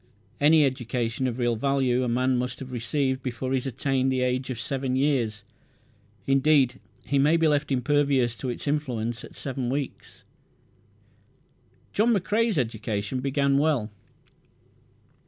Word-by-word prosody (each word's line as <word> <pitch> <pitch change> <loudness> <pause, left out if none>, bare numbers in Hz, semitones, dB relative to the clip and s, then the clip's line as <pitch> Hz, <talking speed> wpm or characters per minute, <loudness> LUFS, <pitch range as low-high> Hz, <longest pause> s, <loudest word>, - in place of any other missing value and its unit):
Any 150 +1 +5
education 125 -1 -2
of 120 -1 -3
real 120 -2 +1
value 130 0 +1
a - - -1
man 130 +2 +1
must 125 0 -2
have 130 -1 -8
received 130 +3 -1
before 130 0 -4
he 135 - +2
has 130 - -3
attained 135 +1 0
to 130 - 0
the 125 - +1
age 125 +1 -1
of 125 -3 -4
seven 130 +1 -2
years. 125 -7 0 0.8
Indeed 135 -2 +3 0.3
he 140 - +1
may 150 +4 +4
be 165 -1 +3
left 145 -1 +1
impervious 135 -2 +2
to 130 - -4
its 120 - -5
influence 120 -6 -2
at - - -12
seven 130 -3 -4
weeks. 140 +1 -5 1.7
John 225 +2 +3
McCrae's 210 +2 +1
education 110 -2 -2
began 140 +1 +1
well. 145 -8 +1
130 Hz, 145 wpm, -26 LUFS, 125-140 Hz, 1.7 s, Any